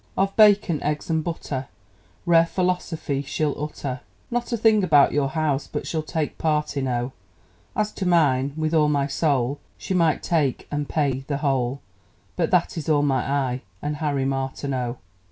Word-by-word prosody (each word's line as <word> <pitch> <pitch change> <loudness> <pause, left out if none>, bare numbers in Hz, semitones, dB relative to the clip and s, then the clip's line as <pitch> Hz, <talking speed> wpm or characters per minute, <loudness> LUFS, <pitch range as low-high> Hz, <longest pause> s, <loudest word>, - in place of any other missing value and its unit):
Of 195 +1 +1
bacon, 205 -7 +5
eggs, 150 +2 -2
and 160 -1 +1
butter, 140 -6 -4 0.6
Rare 165 -1 +5
philosophy 180 -6 -1
she'll 145 +1 -1
utter; 140 -4 -4 0.3
Not 240 +1 -2
a 235 - +1
thing 220 -2 +4
about 150 -6 +5
your 145 -2 +1
house 150 -2 -1
but - - -3
she'll 160 - -2
take 155 -1 -3
part 150 -2 0
in, 135 -1 -1
O! 120 0 -1 0.6
As 210 0 0
to 190 - -3
mine, 140 -6 +3
with 155 0 -1
all 150 -2 +4
my 140 -2 +1
soul, 140 -2 0 0.2
She - - -4
might 165 -4 +2
take 150 -7 0
(and 145 0 -2
pay) 140 -4 0
the 140 - -1
whole 135 -2 0 0.5
But 165 -3 0
that 175 -2 +1
is 155 - -5
all 145 -2 +3
my 135 -3 +1
eye 130 -3 0 0.2
and 150 0 -3
Harry 145 -3 -1
Martineau! 135 -2 -2
150 Hz, 170 wpm, -24 LUFS, 135-165 Hz, 0.6 s, bacon